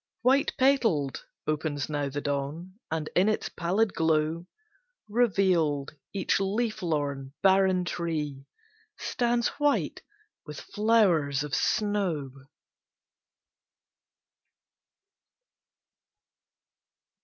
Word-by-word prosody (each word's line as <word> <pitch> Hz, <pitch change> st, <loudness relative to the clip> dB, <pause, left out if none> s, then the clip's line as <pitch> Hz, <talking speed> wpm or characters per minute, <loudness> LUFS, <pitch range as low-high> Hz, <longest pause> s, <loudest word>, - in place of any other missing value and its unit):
White 265 Hz, +3 st, +3 dB
petaled, 225 Hz, -, +2 dB, 0.2 s
opens 150 Hz, -1 st, -2 dB
now 145 Hz, -2 st, -2 dB
the 145 Hz, +1 st, -4 dB
dawn, 145 Hz, +7 st, -4 dB
And 160 Hz, -1 st, -2 dB
in 190 Hz, +4 st, +4 dB
its 215 Hz, -, -1 dB
pallid 190 Hz, +5 st, 0 dB
glow, 160 Hz, +1 st, +1 dB, 0.6 s
Revealed, 185 Hz, -, +2 dB, 0.2 s
each 195 Hz, -1 st, 0 dB
leaf 215 Hz, +3 st, -1 dB
lorn, 140 Hz, -5 st, -2 dB
barren 190 Hz, -1 st, +4 dB
tree 150 Hz, -6 st, -3 dB, 0.5 s
Stands 240 Hz, -1 st, 0 dB
white 290 Hz, -1 st, +1 dB, 0.4 s
with 150 Hz, -2 st, -8 dB
flowers 180 Hz, -11 st, +2 dB
of 150 Hz, -2 st, -7 dB
snow. 195 Hz, -10 st, 0 dB
170 Hz, 80 wpm, -28 LUFS, 145-205 Hz, 0.6 s, in